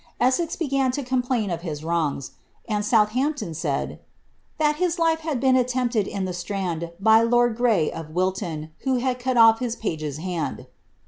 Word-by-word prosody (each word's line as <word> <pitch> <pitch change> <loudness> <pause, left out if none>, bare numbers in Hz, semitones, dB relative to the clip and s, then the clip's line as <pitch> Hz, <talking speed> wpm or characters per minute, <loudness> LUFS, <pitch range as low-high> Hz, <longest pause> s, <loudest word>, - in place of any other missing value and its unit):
Essex 330 +7 +1
began 275 -6 0
to 285 - -2
complain 245 -5 0
of 170 -1 -3
his 155 -4 -5
wrongs; 160 -5 -1 0.4
and 210 -2 -1
South 210 0 +3
ampton 275 - -1
said 150 -3 -2
^ - - -11 0.6
that 300 -1 +2
his 360 0 0
life 325 -1 +2
had 310 -5 -2
been 260 0 +3
attempted 245 -4 +1
in 195 -2 -3
the 185 - -3
Strand 175 -2 -3
by 220 +2 +6
lord 240 0 +3
Grey, 225 -10 +2
of 160 -2 -7
Wilton, 165 -3 -2
who 265 -1 0
had 250 0 -1
cut 255 0 -1
off 225 -1 +7
his 240 -2 -2
pagers 155 - -4
hand. 175 -1 -4
225 Hz, 180 wpm, -24 LUFS, 175-260 Hz, 0.6 s, off